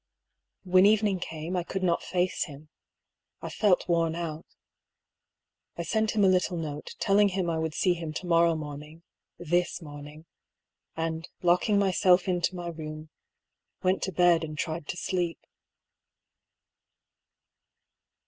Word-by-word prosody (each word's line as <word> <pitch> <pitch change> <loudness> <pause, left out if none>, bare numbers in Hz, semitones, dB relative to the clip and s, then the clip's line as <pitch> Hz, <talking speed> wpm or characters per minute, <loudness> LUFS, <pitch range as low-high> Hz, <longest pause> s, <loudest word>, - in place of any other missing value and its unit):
When 185 +1 +5
evening 210 -3 +3
came, 165 +1 -5
I 180 - +1
could 190 +2 -4
not 170 -2 +2
face 180 0 -1
him. 150 -1 -12 0.7
I - - -6
felt 205 -4 +2
worn 165 -2 +1
out. 165 -2 -5 1.3
I 170 - -2
sent 220 +5 0
him 210 - +3
a - - +6
little 185 -1 +2
note, 150 -2 -6
telling 205 +1 +4
him 185 -2 -1
I 160 - -1
would 160 -1 -3
see 180 - +3
him 165 -2 -5
to 155 - -5
morrow 170 -1 +4
morning 150 +1 -8 0.3
{this 175 +1 0
morning); 150 0 -11 0.7
and 165 0 -3
lock 175 +4 +3
ing 205 - +4
myself 190 -1 +3
into 180 0 0
my 175 -1 -5
room, 155 -1 -8 0.7
went 185 +1 +2
to 190 - -2
bed 175 -2 +4
and 155 -1 -6
tried 160 -1 -3
to - - -4
sleep. 175 0 -1
170 Hz, 140 wpm, -28 LUFS, 160-185 Hz, 1.3 s, a